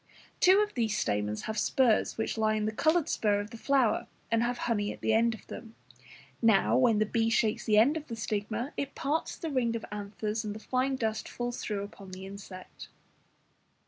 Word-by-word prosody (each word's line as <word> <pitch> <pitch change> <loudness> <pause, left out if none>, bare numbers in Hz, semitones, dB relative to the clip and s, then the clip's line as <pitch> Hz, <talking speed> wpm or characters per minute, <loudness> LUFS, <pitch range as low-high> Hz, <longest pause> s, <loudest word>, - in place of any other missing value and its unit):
Two 380 +3 +6
of 420 0 -1
these 225 -4 0
stamens 105 +1 -1
have 220 0 -2
spurs 240 0 +2
which 220 - -1
lie 215 -1 +1
in 215 -1 -1
the 215 - 0
coloured 315 +7 +2
spur 205 -7 +1
of 205 +1 -6
the - - -8
flower, 260 0 +1 0.2
and 230 0 +3
have 240 +1 0
honey 205 -3 0
at - - -10
the 220 - +2
end 230 +1 +3
of - - -16
them. 225 -1 -10 0.7
Now, 220 -4 +4
when 240 -4 +4
the 215 - +3
bee 225 +1 +1
shakes 225 -1 +1
the 210 -1 +3
end 250 +8 +5
of 310 -1 -5
the 230 - -5
stigma, 215 +4 -3
it 280 -1 -3
parts 300 +4 -2
the 325 -3 -4
ring 240 -4 +1
of 230 - -4
anthers, 210 +1 -3
and 210 -1 -4
the - - -7
fine 260 +4 0
dust 220 -3 -2
falls 240 0 -4
through 205 -2 -3
upon 200 -2 -11
the 190 +1 -7
insect. 195 -2 -10
220 Hz, 210 wpm, -30 LUFS, 210-245 Hz, 0.7 s, Two